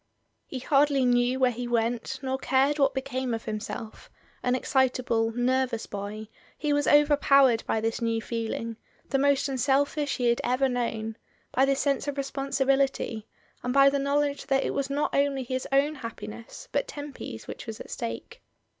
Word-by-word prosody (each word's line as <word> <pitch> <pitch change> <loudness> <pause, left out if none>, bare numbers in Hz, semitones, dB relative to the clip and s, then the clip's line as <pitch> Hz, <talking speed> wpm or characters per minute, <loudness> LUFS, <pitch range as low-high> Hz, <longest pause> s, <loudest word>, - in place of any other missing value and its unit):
He 265 - -5
hardly 275 +1 +3
knew 245 +1 +2
where 255 -1 +4
he 245 +1 -5
went 235 0 -1
nor 265 0 -1
cared 270 +3 +2
what 275 -1 +3
became 260 -2 -2
of 225 - -7
himself; 215 +1 -6 0.3
an 250 0 +1
excitable, 255 -3 +1
nervous 245 0 0
boy, 205 +2 -6 0.3
he 295 -1 0
was 290 0 +1
overpowered 280 -4 +5
by 220 - 0
this 225 +1 -1
new 230 -1 0
feelings 230 0 -4 0.3
the 270 - +1
most 280 0 +3
unselfish 280 +2 +1
he 245 -2 +2
had 235 - +1
ever 255 +2 +2
known, 225 -3 -2 0.3
by 265 - +3
this 275 0 +1
sense 280 0 0
of 285 -1 -3
responsibility, 275 -4 0 0.3
and 250 +1 -2
by 275 0 +7
the 280 - 0
knowledge 285 +1 0
that 270 -1 +2
it - - -1
was 275 -1 -1
not 285 +2 -1
only 280 -1 +1
his 255 +1 -3
own 280 +3 +3
happiness 230 -3 -8
but - - 0
Temp/s 285 - -7
which - - -8
was 220 -1 -6
at - - -9
stake. 115 0 -6
260 Hz, 170 wpm, -27 LUFS, 230-275 Hz, 0.3 s, by